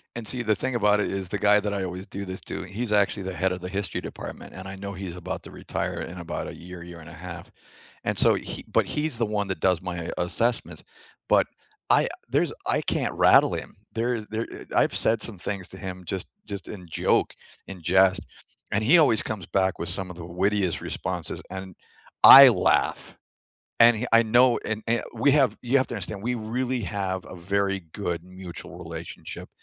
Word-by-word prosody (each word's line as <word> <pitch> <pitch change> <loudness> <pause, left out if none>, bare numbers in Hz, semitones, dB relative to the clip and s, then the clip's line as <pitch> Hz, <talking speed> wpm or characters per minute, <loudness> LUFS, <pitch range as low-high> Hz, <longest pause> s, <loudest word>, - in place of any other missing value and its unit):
And 120 -2 -6
see, 125 - 0
the 110 -2 +2
thing 125 +5 -3
about 105 -2 +3
it - - 0
is 95 -1 -3
the 105 - -2
guy 105 +1 +5
that 105 0 -2
I 100 -1 -2
always 95 +1 -6
do 100 +1 -6
this 95 0 -6
to, - - -6
he's 105 +4 -4
actually 100 -1 +2
the 95 0 -4
head 90 +2 0
of 90 -1 -4
the 90 - -5
history 100 0 -3
department, - - -8
and 95 0 -8
I 95 - -7
know 100 +1 -6
he's 95 -2 -6
about 90 -1 -5
to - - -11
retire - - -4
in 90 - -7
about 85 -1 -5
a - - -7
year, 90 0 -10
year 85 -1 -10
and 80 - -12
a - - -11
half, 85 +1 -9 0.5
and - - -1
so - - +6
he - - -5
but - - +3
he's 150 -4 -2
the 115 - +1
one 105 -1 -1
that 95 - -3
does 90 -3 +2
my 85 -2 -5
assessments, 115 +7 -1 0.4
but - - +4 0.5
I - - +5 0.2
there's - - +1 0.2
I - - +1
can't - - -1
rattle - - +5
him. - - -6 0.2
There 115 0 -1
there 110 +1 -2 0.3
I - - +6
I've - - -2
said 110 -1 +2
some 110 -3 -2
things 95 +1 -4
to 95 - -11
him 95 0 -7
just 95 +1 -4 0.2
just 100 -2 -6
in 90 -4 -9
joke, 80 - +1 0.3
in 95 -3 -9
jest, 95 +2 +3 0.5
and 105 - +1
he 155 +11 +6
always 140 -9 +4
comes 100 -6 -5
back 95 -1 +1
with 85 - 0
some 95 +1 0
of 90 - -8
the 85 -1 -8
wittiest 95 +1 0
responses, 90 -3 -3
and 95 -1 -7 0.5
I - - +12
laugh, - - +1 0.7
and 115 -1 +7
he 125 - -3
I 115 - +7
know 120 +2 +4
and 110 0 -2
and 115 +1 +1
we 120 +5 +3
have 135 -6 +3
you 125 +2 0
have 130 - +1
to - - -5
understand, 100 -2 -5
we 125 +2 0
really 120 +3 -2
have 95 -1 -3
a - - -10
very 95 +2 -1
good 85 -4 -3
mutual 90 -1 -10
relationship, - - -8
95 Hz, 215 wpm, -25 LUFS, 90-110 Hz, 0.7 s, I